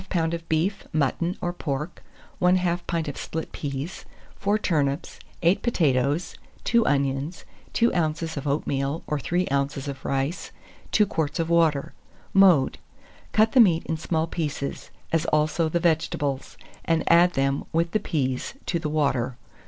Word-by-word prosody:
of 165 0 -1
beef, 180 +5 0
mutton, 160 +4 0
or 175 0 -1
pork; 150 0 -4 0.4
1/2 180 -1 +2
pint 165 -2 -1
of 145 - -5
split 160 0 -5
peas, 140 +4 -5 0.3
4 205 +2 +1
turnips, 150 -6 -1 0.2
8 170 +4 +4
potatoes, 145 - +1 0.3
2 235 0 +3
onions, 140 +3 0 0.3
2 235 0 +3
oz. 160 -1 -1
of 145 0 -4
oatmeal 140 +1 -1
or 150 - -1
3 175 +6 0
oz. 140 0 -1
of 140 -2 -6
rice, 135 +5 -2 0.4
2 210 - +4
quarts 160 -6 -2
of 165 0 -1
water. 160 -4 +2 0.4
Mode. 185 -9 +5 0.5
Cut 220 +1 +4
the 260 - +4
meat 175 -8 +5
in 160 - -1
small 160 0 -1
pieces, 150 -4 -4 0.2
as 165 0 +1
also 155 +2 +2
the 170 - 0
vegetables, 150 -4 -1 0.3
and 165 -1 +1
add 175 +1 +5
them, 135 +1 0
with 165 +1 +1
the 215 - +2
peas, 130 - -2
to 170 - 0
the 155 -2 -3
water. 135 -5 0
160 Hz, 150 wpm, -25 LUFS, 140-175 Hz, 0.5 s, Mode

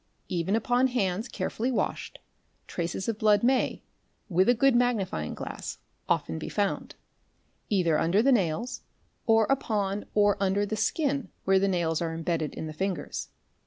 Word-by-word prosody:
_ - - -43 0.3
Even 180 +3 0
upon 245 +3 +2
hands 215 -3 -1
carefully 240 0 -2
washed, 245 - -2 0.5
traces 175 +2 -3
of 225 -2 -2
blood 210 0 +4
may, 255 +1 +2 0.5
with 185 +4 +3
a 245 - +5
good 270 +2 +4
magnifying 215 - 0
glass, - - -6 0.3
often 80 0 0
be - - -5
found, 200 -2 -1 0.7
either 175 -6 +2
under 185 +7 +3
the 275 - +4
nails, 215 +2 0 0.5
or 225 -1 +5
upon 210 -6 -1
or 205 -1 +4
under 200 +1 +2
_ - - -8
the 215 - -1
skin 280 +4 0
where 190 0 +4
the 195 - +2
nails 170 -4 0
are 165 -1 -1
imbedded 165 -2 -2
in - - -5
the 155 - -6
fingers. 180 -2 -3
200 Hz, 160 wpm, -28 LUFS, 175-235 Hz, 0.7 s, a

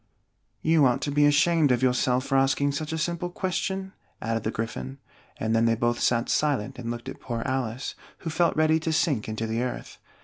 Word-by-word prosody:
"You 160 -3 +5
ought 125 - +1
to 145 - -2
be 145 +1 +4
ashamed 145 0 +4
of 125 +1 +1
yourself 125 0 +2
for 135 - -1
asking 135 +1 +3
such 150 +2 -4
a 160 - -2
simple 170 +2 -2
question," 190 +1 -3 0.3
added 115 0 -1
the 110 - -2
Gryphon; 70 - -4 0.4
and 110 0 0
then 115 0 +3
they 115 0 +3
both 120 +1 0
sat 120 0 +2
silent 135 -4 0
and 115 -1 -5
looked 120 0 -5
at - - -7
poor 115 -2 -3
Alice, 130 -2 -2 0.3
who 165 - -4
felt 170 +2 +2
ready 155 0 +4
to 160 0 -2
sink 145 -10 +1
into 110 +1 -3
the 115 +1 -1
earth. 125 0 -5
130 Hz, 205 wpm, -26 LUFS, 115-155 Hz, 0.4 s, You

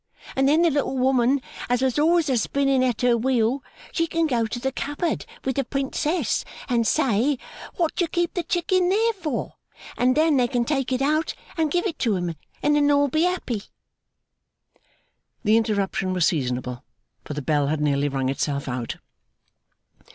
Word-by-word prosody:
And 270 +1 +3
then 315 +4 +4
the 340 - +4
little 275 -2 -1
woman 260 +1 +2 0.3
as 245 +1 +1
was 260 +2 +1
always 330 +1 +3
a 265 - +2
spinning 275 +2 +1
at 245 -4 0
her 245 -1 +4
wheel, 250 +1 +1 0.3
she 330 -1 0
can 330 0 +1
go 240 -6 +1
to 240 +3 -4
the 265 +2 -1
cupboard 290 +5 -3 0.2
with 265 0 -1
the 275 - +2
Princess, 280 +6 -1 0.2
and 235 -3 +1
say, 265 -1 +2 0.4
what 335 -3 0
do 350 - +1
you - - -7
keep 345 0 -1
the 355 - -1
Chicking 355 +2 +1
there 450 +4 +2
for? 320 - -4 0.4
and 255 +2 +2
then 310 -2 +4
they 245 -1 +3
can 240 -2 0
take 270 -1 -1
it 260 +1 +1
out 310 +3 +1 0.2
and 320 -2 +1
give 350 +5 0
it 335 -7 -3
to 225 -4 +1
him, 175 -2 -2 0.3
and 295 0 +3
then 290 -1 +3
all 285 0 +3
be 315 +5 +2
happy!' 310 - -1 1.8
The 215 0 +4
interruption 200 -4 0
was 180 -3 +2
seasonable, 125 -4 -1 0.4
for 150 - -6
the 150 - -4
bell 145 0 +1
had 155 +1 0
nearly 145 -1 +1
rung 135 -1 -1
itself 140 +1 -2
out. 125 -2 -3
265 Hz, 180 wpm, -24 LUFS, 220-310 Hz, 1.8 s, then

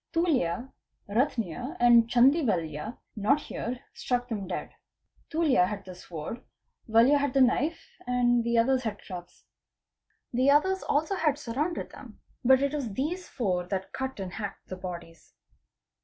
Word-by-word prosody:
Tuljya, 265 - +1 0.4
Ratnya 245 - -1
and 235 -1 +6
Chandy 265 +7 +5
Valya 165 - -2 0.2
not 230 +8 +2
here, 245 -3 -5
struck 245 0 -2
them 205 -5 -3
dead. 180 - -4 0.6
Tuljya 300 - +3
had 205 0 -5
the 185 - -8
sword; 175 +5 -7 0.5
Valya 235 +6 +5
had 280 -2 0
the 270 - +5
knife, 290 +6 +2 0.2
and 245 -1 +3
the 235 0 +1
others 255 +3 +3
had 220 -4 -3
clubs. 175 -2 -10 0.9
The 255 +3 +3
others 375 +7 +3
also 310 +7 0
had 305 -6 +1
surrounded 295 +6 -3
them, - - -12 0.2
but 265 +2 +5
it 280 +1 0
was 275 -7 -2
these 320 - -3
four 180 -7 -1
that 190 0 -4
cut 265 -3 -4
and 185 -2 -5
hacked 205 -2 -6
the 185 - -4
bodies. 175 -3 -9
245 Hz, 150 wpm, -28 LUFS, 195-280 Hz, 0.9 s, and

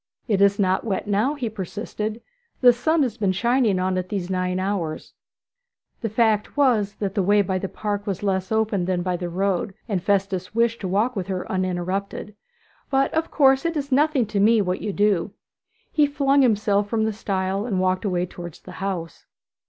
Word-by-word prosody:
'It 205 -4 +1
is 200 0 +4
not 190 -2 +1
wet 205 -4 -2
now,' 210 +8 +1
he 260 -5 -3
persisted; 215 +2 -5 0.4
'the 245 -1 +8
sun 315 +6 +2
has 235 -4 -2
been 200 -5 +1
shining 235 +1 +2
on 185 0 0
it 180 0 -5
these 190 -3 -3
nine 185 0 -1
hours.' 185 -5 -3 0.9
The 225 - -1
fact 220 +2 +1
was 220 -8 +2
that 195 -2 -3
the 200 - +1
way 205 +2 +4
by 185 0 -1
the 195 - -4
path 205 0 -3
was 195 0 -3
less 190 -1 -1
open 220 -4 +1
than 180 -1 -1
by 180 -1 -1
the 175 0 -4
road, 190 +2 -1
and 200 -6 -1
Festus 195 0 -1
wished 230 0 +1
to 190 - -2
walk 215 +7 +1
with 190 -3 -3
her 185 -2 -3
uninterrupted. 185 +2 -2 0.6
'But, 270 -1 +1
of 320 +1 0
course, 270 -3 +4
it 335 -1 -1
is 280 -1 -4
nothing 285 -2 +3
to 210 -1 -2
me 220 +3 +5
what 185 -2 -1
you 210 - -2
do.' 200 -2 +1 0.6
He 300 -2 +3
flung 280 -1 +2
himself 205 -4 +2
from 220 -1 +1
the 220 0 0
stile 195 0 -2
and 195 -6 0
walked 185 +1 +1
away 180 -3 0
towards 175 -2 -9
the 185 - -11
house. 180 -4 -4
200 Hz, 195 wpm, -23 LUFS, 185-230 Hz, 0.9 s, the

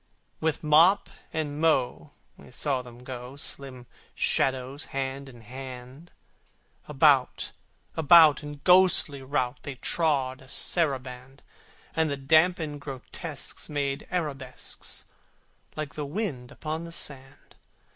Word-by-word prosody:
With 160 0 -1
mop 165 +6 +5 0.2
and 150 -1 -3
mow, 155 -6 +1 0.3
we - - -16
saw 135 -3 -1
them 125 0 -13
go, 125 0 -7
Slim 135 -3 -5 0.3
shadows 130 +2 +1
hand 135 0 -4
in 120 -3 -14
hand: 130 +5 -10 0.8
About, - - +3 0.4
about, 160 -1 +7
in 145 -1 -8
ghostly 180 -6 +5
rout 130 -1 -1
They 140 - -6
trod 135 -3 +1
a 130 - -16
saraband: 135 -5 -1 0.5
And 160 -1 +2
the 140 - -2
damned 155 +1 +2
grotesques 140 +3 -6
made 140 -1 -2
arabesques, 140 -8 -4 0.7
Like 150 -2 -4
the 150 -2 -4
wind 145 - -3
upon 155 +1 -4
the 170 - -9
sand! 140 -3 -7
140 Hz, 115 wpm, -27 LUFS, 130-155 Hz, 0.8 s, about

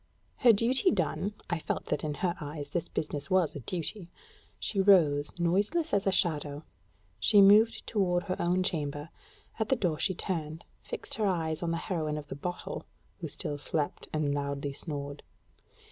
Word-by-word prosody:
Her 245 - +7
duty 235 +4 +3
done 200 +2 -1
I 175 -2 -1
felt - - -3
that - - -2
in 150 -1 -2
her 175 +2 0
eyes 145 -1 -5
this 170 +2 -2
business 145 -2 -3
was 185 -4 +2
a - - -4
duty 175 - -4 0.5
she 195 - +1
rose, 155 -7 +5
noiseless 200 - +1
as 200 0 +2
a - - +4
shadow: 150 -5 0 0.6
she 210 - +5
moved 210 +3 +6
toward 180 -4 +1
her 185 -2 -2
own 180 +2 +2
chamber; 150 -4 -2 0.5
at 220 - 0
the 265 - +4
door 170 -9 0
she 185 - +1
turned, 160 -3 -4 0.2
fixing 220 - -5
her 205 - +3
eyes 160 -4 -1
on 170 - -1
the 165 - 0
heroine 160 -5 -2
of 145 -1 -7
the - - -4
bottle, 175 +5 -5 0.3
who - - -4
still 145 -1 -5
slept 145 0 -2
and 150 -2 0
loudly 140 0 -2
snored. 145 -1 -5
170 Hz, 175 wpm, -30 LUFS, 150-195 Hz, 0.6 s, Her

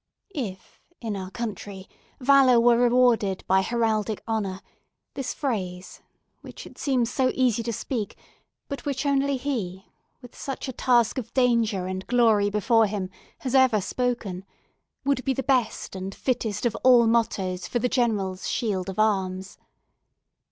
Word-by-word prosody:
If, 210 - -6 0.2
in 220 -3 -4
our 190 -1 -5
country, 200 -3 -6 0.3
valour 265 -2 +5
were 240 0 +5
rewarded 240 -5 +3
by 190 0 +3
heraldic 220 -1 -1
honour, 200 -4 -2 0.5
this 270 -2 -3
phrase—which 185 -9 -6
it - - -14
seems 250 -4 +1
so 260 -1 +2
easy 245 -3 +2
to 235 +1 -3
speak, 230 -1 -4 0.5
but 280 - -6
which 280 -1 -2
only 280 -1 +2
he, 210 -9 -4 0.3
with 245 -2 -14
such 275 0 -5
a 260 - -4
task 240 -1 +2
of 240 - -8
danger 230 -7 +2
and 185 0 -5
glory 225 -4 +3
before 215 +2 +3
him, 195 -2 -4 0.3
has 260 -2 -3
ever 260 -5 +5
spoken—would 245 +4 -4
be 270 - +1
the 270 - -2
best 255 -7 0
and 190 +1 -5
fittest 225 -4 -2
of 235 - +1
all 245 -2 +7
mottoes 195 -5 0
for - - -1
the 250 - +1
General's 210 -7 -1
shield 195 -5 -1
of 190 - -6
arms. 190 -3 0
230 Hz, 145 wpm, -25 LUFS, 195-250 Hz, 0.5 s, all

